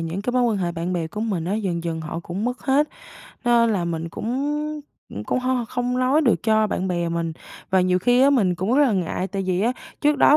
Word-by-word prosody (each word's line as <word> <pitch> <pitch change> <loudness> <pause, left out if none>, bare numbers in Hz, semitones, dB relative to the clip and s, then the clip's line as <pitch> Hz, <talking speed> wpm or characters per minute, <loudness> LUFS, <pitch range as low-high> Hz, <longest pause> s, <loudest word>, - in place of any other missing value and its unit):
những 165 +4 -3
cái 245 - -1
mối 250 0 +3
quan 230 -4 +2
hệ 175 -2 -1
bạn 170 +2 -3
bè 170 -2 -1
của 210 +6 -6
mình 200 -7 -1
á, 185 +4 -1
dần 180 -6 -2
dần 165 -1 -2
họ 165 +1 -5
cũng 185 +6 -4
mất 250 +1 -2
hết, 290 +3 +2 0.6
nên 235 -1 +4
là 185 -4 0
mình 165 -1 -3
cũng 295 - -2 0.5
cũng - - +1
hông 255 -1 0
không 250 0 -1
nói 260 +4 +3
được 255 -7 +2
cho 220 -1 +3
bạn 190 -2 -2
bè 175 -1 -1
mình. 165 -1 -2 0.4
Và 190 -1 +4
nhiều 180 0 +2
khi 245 +6 +3
á, 275 - +6
mình 205 -10 +3
cũng 190 +7 0
rất 290 +2 +5
là 250 - +2
ngại, 185 0 -1
tại 195 0 -3
vì 185 -1 0
á, 235 +4 +2 0.3
trước 295 -1 +2
đó 295 - +7
210 Hz, 250 wpm, -23 LUFS, 175-250 Hz, 0.6 s, đó